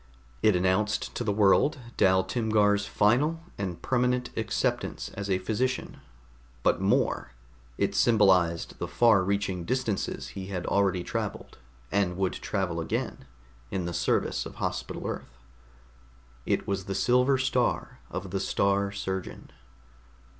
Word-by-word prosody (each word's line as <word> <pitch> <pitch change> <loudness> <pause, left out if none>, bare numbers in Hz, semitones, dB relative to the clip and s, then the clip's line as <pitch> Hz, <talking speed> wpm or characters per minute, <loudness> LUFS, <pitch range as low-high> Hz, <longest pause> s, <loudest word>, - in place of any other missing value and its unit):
It 110 -3 +4
announced 95 +4 +1
to - - -3
the 110 - 0
world 105 +9 +4 0.2
Dal 95 0 +4
Timgar's 105 -3 +2
final 130 +12 +2 0.2
and 90 -4 -3
permanent 125 -1 +1
acceptance 110 -1 -1
as 100 0 -5
a 95 - +3
physician; 115 +7 -2 0.7
but - - +2
more, 60 - +1 0.4
it - - 0
symbolized 95 -7 +3
the - - -2
far 110 -5 +4
reaching 100 -2 -1
distances 120 -1 -2
he 95 -1 -7
had 90 -3 -4
already 95 -3 +1
traveled, - - -5 0.3
and 95 -3 +1
would 95 -1 0
travel 95 -4 -2
again, 80 -4 -3 0.4
in 90 +4 -2
the 85 - -3
service - - 0
of - - -12
Hospital - - -4
Earth. - - -6 1.1
It - - 0
was 100 -2 -2
the 95 - -3
silver 125 +5 +3
star 130 -1 0
of 95 0 -5
the 95 - -1
Star 100 0 +1
Surgeon. 95 -2 -5
100 Hz, 130 wpm, -28 LUFS, 95-115 Hz, 1.1 s, It